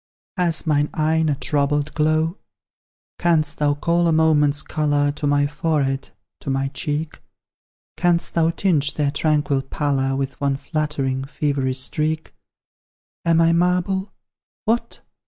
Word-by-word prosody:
Has 175 -3 0
mine 150 -1 +2
eye 160 +1 +2
a 145 - +1
troubled 145 +1 0
glow? 155 +3 +1 0.8
Canst 160 -4 +1
thou 145 -1 +2
call 170 +3 +1
a - - +3
moment's 155 -2 +3
colour 145 -2 +1
To 145 0 -3
my 145 0 +3
forehead 145 -2 -1 0.3
to - - -6
my 135 0 0
cheek? 150 +2 -4 0.8
Canst 175 -1 +1
thou 165 -1 +3
tinge 165 -5 +1
their 145 -2 +1
tranquil 150 -2 +1
pallor 135 -1 -1
With 135 +1 -4
one 140 -1 +1
flattering, 140 -4 -2
feverish 140 -2 -1
streak? 155 +3 -2 0.9
Am 165 -1 +4
I 165 0 +4
marble? 180 +3 +1 0.5
What! 230 +2 -1
150 Hz, 130 wpm, -21 LUFS, 145-160 Hz, 0.9 s, Am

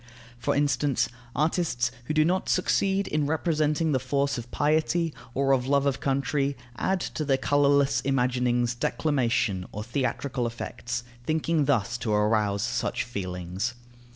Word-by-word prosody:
For 120 - 0
instance, 140 -1 +1 0.3
artists 150 -5 +1
who 155 - -2
do 155 0 +5
not 185 +3 0
succeed 195 +1 +2
in 150 -1 0
representing 155 0 +1
the 130 - +2
force 140 +2 0
of 120 0 -9
piety 155 +3 +1 0.2
or 135 0 +2
of 130 -1 +2
love 140 0 +3
of 135 -1 +1
country, 140 +1 0 0.2
add 190 +9 0
to 155 - -3
their 135 -2 +2
colourless 140 0 +3
imaginings 125 -2 +1
declamation 120 -8 0
or 105 - -5
theatrical 130 +1 -1
effects, 120 +1 -5 0.2
thinking 160 -1 +1
thus 120 -3 +1
to 115 - -2
arouse 105 -1 +2
such 120 0 -1
feelings. 95 +1 -4
135 Hz, 140 wpm, -27 LUFS, 120-150 Hz, 0.3 s, do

